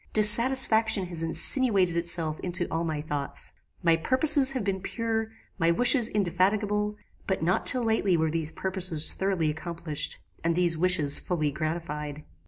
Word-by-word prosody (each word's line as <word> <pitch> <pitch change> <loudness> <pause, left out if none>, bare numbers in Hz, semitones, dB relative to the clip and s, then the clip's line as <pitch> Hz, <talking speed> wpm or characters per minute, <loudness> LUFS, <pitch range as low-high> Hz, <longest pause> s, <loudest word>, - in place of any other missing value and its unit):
Dissatisfaction 220 -1 +3
has 170 -2 -6
insinuated 190 - +2
itself 170 -2 -1
into 175 -1 -1
all 165 +1 -2
my 155 -3 -4
thoughts. 145 -2 -3 0.3
My 165 -1 +3
purposes 270 - +5
have 255 -5 -4
been 190 -1 -3
pure; 225 +1 -4 0.3
my 165 -1 +1
wishes 245 +6 +4
indefatigable; 210 +2 -1 0.3
but 190 -4 -2
not 180 +3 -1
till 250 -1 0
lately 210 -5 0
were 160 -1 -1
these 160 -1 -2
purposes 185 -5 0
thoroughly 190 -5 -2
accomplished, 160 -1 -5 0.3
and 165 0 -1
these 175 -1 +1
wishes 160 -4 +3
fully 155 -5 -3
gratified. 150 -1 -6
180 Hz, 145 wpm, -26 LUFS, 165-210 Hz, 0.3 s, purposes